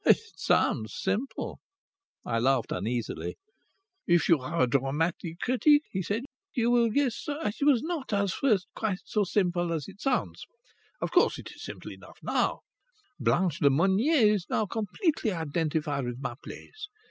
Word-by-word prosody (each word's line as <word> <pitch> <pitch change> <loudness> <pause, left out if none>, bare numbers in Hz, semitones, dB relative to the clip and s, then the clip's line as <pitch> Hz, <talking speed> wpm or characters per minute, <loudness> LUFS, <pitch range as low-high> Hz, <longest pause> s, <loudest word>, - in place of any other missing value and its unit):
"It - - +6 0.2
sounds 110 -1 +1
simple." 210 +8 -2 0.7
I 115 -1 0
laughed 130 -1 +2
uneasily. 115 +5 -3 0.7
"If 175 -1 +4
you 165 -4 +6
are 130 +3 0
a - - +3
dramatic 155 +6 -1
critic," 290 +4 +4
he 190 - -1
said, 205 +6 -2 0.3
"you 240 -2 +2
will 235 -1 +4
guess 260 0 0
that 290 -8 -3
it - - +2
was 275 -6 +4
not 320 -6 -3
at 200 -2 +1
first 210 -5 +2
quite 210 -4 -1
so 210 - +1
simple 175 -3 0
as 160 -4 -2
it 200 - -12
sounds. 270 -2 -1 0.6
Of - - -2
course - - +4
it - - -9
is - - -13
simple - - -7
enough - - -13
now. - - 0 0.6
Blanche 175 -4 +1
Lemonnier 200 - +4
is 195 -4 -3
now 215 - +1
completely 225 - -1
identified 155 -3 -1
with 120 0 -4
my 135 -3 -3
plays. 425 -1 -9
190 Hz, 160 wpm, -28 LUFS, 150-235 Hz, 0.7 s, It